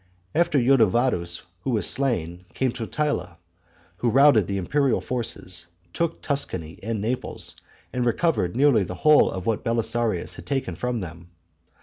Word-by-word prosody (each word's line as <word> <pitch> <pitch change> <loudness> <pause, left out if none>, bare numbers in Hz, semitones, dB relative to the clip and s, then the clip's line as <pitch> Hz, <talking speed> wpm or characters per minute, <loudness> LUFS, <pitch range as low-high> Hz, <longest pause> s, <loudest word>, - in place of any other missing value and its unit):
After 170 -3 +2
Ildovadus, 120 -8 +2 0.2
who 135 - -3
was 115 -4 +2
slain, 90 -10 -1
came 130 -2 +1
Totila, 115 - -2 0.6
who 120 - +1
routed 130 -6 +5
the 100 - -2
imperial 135 +7 +1
forces, 115 -8 -3 0.3
took 170 -1 -2
Tuscany 95 - -2
and 110 +1 -3
Naples, 115 +5 -3 0.4
and 125 - 0
recovered 120 - +1
nearly 135 -4 +4
the 90 0 -6
whole 150 -1 +7
of 95 -1 -5
what 110 -2 0
Belisarius 115 -4 0
had - - -11
taken 135 - -2
from 125 +1 -2
them. 85 0 -9
115 Hz, 140 wpm, -24 LUFS, 90-135 Hz, 0.6 s, whole